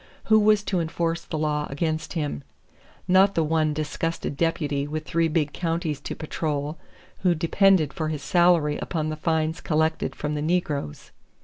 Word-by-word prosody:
Who 220 0 +5
was 210 -1 +4
to 190 -3 -1
enforce 165 0 -1
the 160 - -4
law 150 -1 -1
against 155 +3 -2
him? 145 - -3 0.6
Not 190 +2 +5
the 165 - +3
one 155 0 +1
disgusted 155 +1 -3
deputy 145 -3 0
with 155 +1 -4
three 165 +1 +1
big 150 -2 0
counties 165 -3 -2
to - - -5
patrol 150 -1 -3 0.4
who 180 -2 +2
depended 165 -2 +3
for 155 +1 -2
his 150 -2 -4
salary 170 -4 +3
upon 155 -3 -2
the 155 - -3
fines 160 0 -1
collected 160 0 0
from 150 0 -3
the 150 - -2
negroes. 150 - -2
160 Hz, 165 wpm, -25 LUFS, 150-170 Hz, 0.6 s, Who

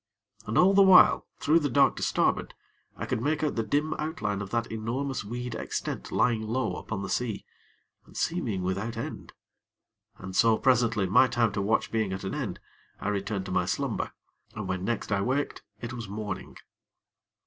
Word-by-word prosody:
And 110 - -1
all 190 +2 +6
the 200 - +6
while, 190 -2 +7
through 155 +3 +3
the 145 -3 -1
dark 140 +3 +4
to - - -5
starboard, - - +1 0.4
I - - -4
could 110 - -2
make 150 +4 0
out 150 - +1
the 115 - +1
dim 145 +8 0
outline 105 -10 -2
of 100 - -6
that 115 +1 -1
enormous 120 +4 -2
weed 120 +3 -5
extent - - -4
lying 115 -3 +2
low 115 +2 -1
upon 100 -3 -5
the - - -3
sea, 115 -5 -2 0.6
and - - -13
seeming 125 - -1
without 100 +5 -2
end. 115 - -6 0.9
And 95 0 -8
so, 115 +1 +5
presently, 115 -5 +3
my 105 +8 +5
time 120 -3 +1
to 100 - -2
watch 105 +3 +1
being 110 -4 0
at 95 - -5
an 95 - -3
end, - - -3 0.4
I - - -2
returned 100 -1 -2
to - - -6
my 90 -1 +1
slumber, 95 - -2 0.4
and - - -4
when 95 0 -2
next 115 +1 -2
I 100 -1 +2
waked 135 +7 -1 0.2
it 120 0 -5
was 115 -4 -6
morning. 105 -1 -5
115 Hz, 185 wpm, -28 LUFS, 100-130 Hz, 0.9 s, while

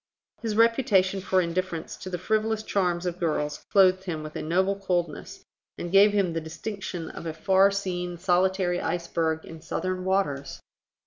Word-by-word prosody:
His 225 -3 -2
reputation 210 -5 +3
for 185 -1 +2
indifference 170 -1 -3
to 185 - -7
the 180 - -3
frivolous 215 +3 0
charms 180 -4 0
of 180 0 -3
girls 150 -3 -2
clothed 190 -1 +5
him 160 -4 -4
with 155 0 -8
a - - -3
noble 185 +5 +1
coldness, 175 -5 -3 0.3
and 175 - -5
gave 200 +2 +7
him 195 -4 +1
the 165 - -2
distinction 175 +1 -6
of 165 - -7
a 160 - -3
far 190 +4 +4
seen 180 -3 -3
solitary 180 0 +1
iceberg 165 -1 -1
in 165 -1 -10
Southern 185 +2 -3
waters. 145 -8 -1
185 Hz, 165 wpm, -26 LUFS, 170-195 Hz, 0.3 s, gave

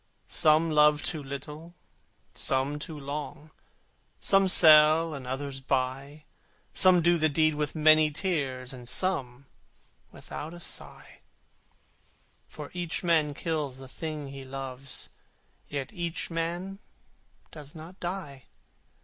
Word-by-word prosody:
Some 155 +1 +3
love 150 -1 +4
too 155 - 0
little, 150 +5 -9 0.6
some 135 +2 0
too 155 0 -7
long, 150 +2 -7 0.7
Some 195 -1 +4
sell, 155 -1 +7
and 135 -3 -7
others 135 +1 -4
buy; 135 +3 -3 0.5
Some 180 -2 +5
do 170 0 +3
the 155 0 +3
deed 155 +1 +2
with 150 0 -3
many 155 0 +5
tears, 140 -7 -2
And 125 -1 -9
some 140 -9 0 0.7
without 160 +3 -8
a - - -11
sigh: - - -7 1.3
For 150 -1 -10
each 175 -1 -4
man 155 -4 +1
kills 150 -6 -3
the 135 0 -10
thing 150 0 -6
he 135 0 -9
loves, 135 0 -4 0.6
Yet 140 +5 -5
each 170 -2 -4
man 175 +4 -4 0.7
does 150 -1 -9
not 165 +4 -11
die. 170 -8 -6
150 Hz, 120 wpm, -28 LUFS, 140-165 Hz, 1.3 s, sell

